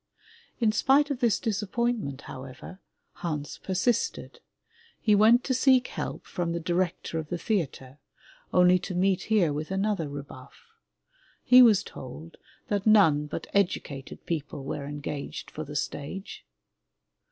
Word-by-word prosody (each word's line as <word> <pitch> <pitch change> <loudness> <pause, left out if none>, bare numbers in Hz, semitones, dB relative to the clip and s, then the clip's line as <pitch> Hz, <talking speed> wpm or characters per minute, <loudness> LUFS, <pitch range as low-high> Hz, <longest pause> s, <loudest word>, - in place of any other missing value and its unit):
In 225 -3 +3
spite 275 +6 +3
of 270 - -2
this 235 -4 +2
disappointment, 215 - -2
however, 130 +8 -10 0.4
Hans 150 -4 -4
persisted. 190 +6 -1 0.6
He 215 - +3
went 225 +5 +6
to 260 - 0
seek 260 -1 +4
help - - -5
from 170 -1 -3
the 170 - -2
Director 175 -1 -1
of 155 -1 -7
the 175 - -2
Theatre, 150 - -3 0.5
only 180 0 +5
to 185 0 -6
meet 190 +1 +1
here 190 -9 +3
with 150 +2 -4
another 195 -4 -1
rebuff. 140 - -10 0.8
He 255 0 +8
was 220 -5 +6
told 155 +6 -10 0.3
that 205 0 -1
none 160 -9 +5
but - - -5
educated 175 -8 -2
people 150 -3 -4
were 140 +1 -5
engaged 145 0 -6
for 155 - -5
the 145 -1 -9
stage. 190 +9 -5
180 Hz, 135 wpm, -27 LUFS, 150-215 Hz, 0.8 s, He